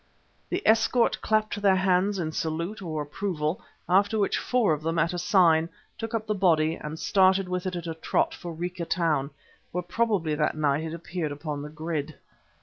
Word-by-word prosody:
The - - -2
escort 225 +2 +3
clapped 215 -1 0
their 195 -2 +5
hands 190 +1 +2
in 160 -3 -2
salute 170 +6 -3
or 155 -4 -3
approval, 155 +1 -3 0.3
after 200 +4 +3
which 205 - +1
four 245 -9 +2
of 150 - -3
them, 165 +1 -1
at 165 +2 +2
a 175 - -2
sign, 170 -4 +4 0.3
took 225 0 -4
up 220 -1 -2
the 215 - 0
body 165 -5 +3
and 155 -1 -6
started 190 +1 +3
with 180 0 -2
it 185 - -3
at 175 -1 -5
a 165 - -3
trot 160 - 0
for 175 - -7
Rica 175 +1 -4
Town, 155 -6 0 0.4
where 180 +1 -2
probably 190 -4 0
that 150 0 0
night 150 0 +1
it 160 +1 -4
appeared 170 -2 -4
upon 145 0 -5
the 150 - -7
grid. 155 -1 -4
170 Hz, 190 wpm, -27 LUFS, 155-195 Hz, 0.4 s, their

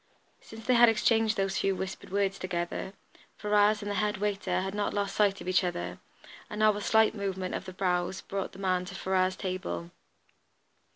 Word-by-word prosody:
Since 225 0 -12
they 255 - +3
had 240 -1 +7
exchanged 225 0 +2
those 195 -1 0
few 195 -1 +1
whispered 190 +1 -6
words 195 0 0
together, 175 +1 -3 0.4
Ferrars 210 0 +3
and 205 - -3
the - - -1
head 210 0 0
waiter 195 -2 -1
had 190 +1 -3
not 205 0 -1
lost 200 -1 -1
sight 205 -2 +2
of - - -8
each 185 0 +3
other, 90 - -3 0.5
and 210 - -6
now 215 -1 +5
a 205 - -4
slight 220 +1 +4
movement 190 -3 -3
of - - -4
the 185 - -7
brows 180 -1 -1
brought 195 -1 -4
the - - -12
man 185 -2 0
to 195 +1 -8
Ferrars' 185 -1 +1
table. 85 - -4
195 Hz, 190 wpm, -29 LUFS, 185-210 Hz, 0.5 s, had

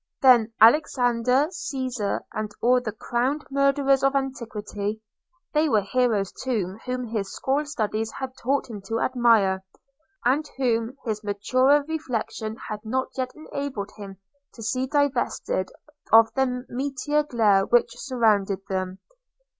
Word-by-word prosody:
– - - -61
Then 240 -4 +6
Alexander, 250 +1 +4
Caesar, 255 - -3
and 215 0 -3
all 250 +1 +3
the 220 - -4
crowned 245 +7 -2
murderers 275 0 +3
of 275 0 +3
antiquity 220 -6 -3 0.3
– 350 +1 -46
they 305 0 +3
were 215 -5 +3
heroes 215 -3 +1
too 215 -6 -3
whom 250 0 -2
his 215 -4 -3
school 285 +3 -1
studies 220 -5 -2
had 265 -1 -5
taught 275 +3 0
him 215 -4 -8
to 225 +2 -1
admire, 225 -7 +3 0.6
and 290 +5 +2
whom 235 -1 0
his 215 -2 -3
maturer 255 +8 +2
reflection 235 -8 -3
had 210 - -4
not 260 +4 -1
yet 255 -1 -2
enabled 280 -8 -5
him 195 -2 -9 0.4
to 225 - -9
see 255 +4 -1
divested 265 -9 0 0.4
of 225 0 +7
the 255 -1 -1
meteor 280 +3 -1
glare 215 -9 +2
which 240 -1 +3
surrounded 215 -7 +1
them. 185 -1 -2
245 Hz, 140 wpm, -25 LUFS, 215-270 Hz, 0.6 s, of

